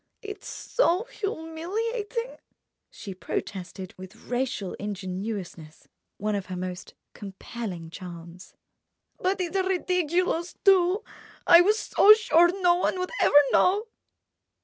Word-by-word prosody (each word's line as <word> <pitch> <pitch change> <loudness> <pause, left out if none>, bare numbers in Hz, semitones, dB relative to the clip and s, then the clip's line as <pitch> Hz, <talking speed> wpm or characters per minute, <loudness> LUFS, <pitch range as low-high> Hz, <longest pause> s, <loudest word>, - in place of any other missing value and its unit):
"It's 410 -1 -8
so 390 -5 0
humiliating!" 430 +4 -4 0.5
she 195 - -9
protested 185 0 -6
with 185 +2 -10
racial 245 -6 -2
ingenuousness—one 195 -1 -6
of 200 -2 -3
her 185 - -5
most 180 0 -6 0.2
compelling 195 -4 -7
charms. 175 0 -10 0.6
"But 380 +1 0
it's 360 0 -3
ridiculous, 360 -2 0
too. 380 +2 +4 0.4
I 340 - +8
was 420 +4 +3
so 425 -1 +6
sure 345 -5 +4
no 350 -1 +6
one 365 - 0
would 365 0 -3
ever 290 - +5
know." 415 +5 +3
325 Hz, 105 wpm, -26 LUFS, -, 0.6 s, I